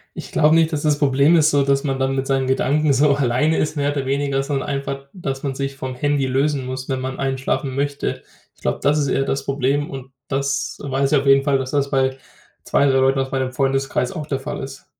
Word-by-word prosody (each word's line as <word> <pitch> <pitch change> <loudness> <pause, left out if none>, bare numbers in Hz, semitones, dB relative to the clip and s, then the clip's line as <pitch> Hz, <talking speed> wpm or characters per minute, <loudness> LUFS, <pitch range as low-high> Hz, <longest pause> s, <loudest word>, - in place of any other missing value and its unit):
Ich - - -8
glaube 155 +1 +4
nicht, 165 -1 +3
dass 145 - -1
das 150 -1 +2
Problem 140 +3 +4
ist, 155 -1 +4
so 145 -1 +3
dass 140 0 +1
man 135 -2 -1
dann 135 0 0
mit 135 0 -1
seinen 135 -1 0
Gedanken 140 +3 +2
so 140 +2 +4
alleine 140 +4 +1
ist, 155 - -1
mehr 145 0 +1
oder 140 -2 -3
weniger, 140 0 0
sondern 135 -1 -2
einfach, 140 -1 -4
dass 135 -8 -5
man 140 -2 -2
sich 135 0 -4
vom 130 -1 -5
Handy 145 0 0
lösen 135 +1 0
muss, 130 +1 -6
wenn 130 -1 -1
man 130 0 -5
einschlafen 135 0 -1
möchte. 140 +1 -2 0.3
Ich - - -28
glaube, - - -1
das 145 +1 +2
ist 145 - +1
eher 135 - +1
das 135 0 -2
Problem 140 +1 0
und 135 -1 -8 0.2
das 140 0 -2
weiß 140 0 -1
ich 150 - +5
auf 135 - -4
jeden 135 0 +6
Fall, 140 -1 +2
dass 130 0 -4
das 140 -1 0
bei 130 -1 +1 0.5
2, 140 - +2
3 135 -1 +3
Leuten 135 +1 +3
aus 135 0 -2
meinem 130 -1 -1
Freundeskreis 135 -1 0
auch 150 - -5
der 135 -3 -2
Fall 135 - -5
ist. 135 0 -9
135 Hz, 240 wpm, -21 LUFS, 135-145 Hz, 0.5 s, jeden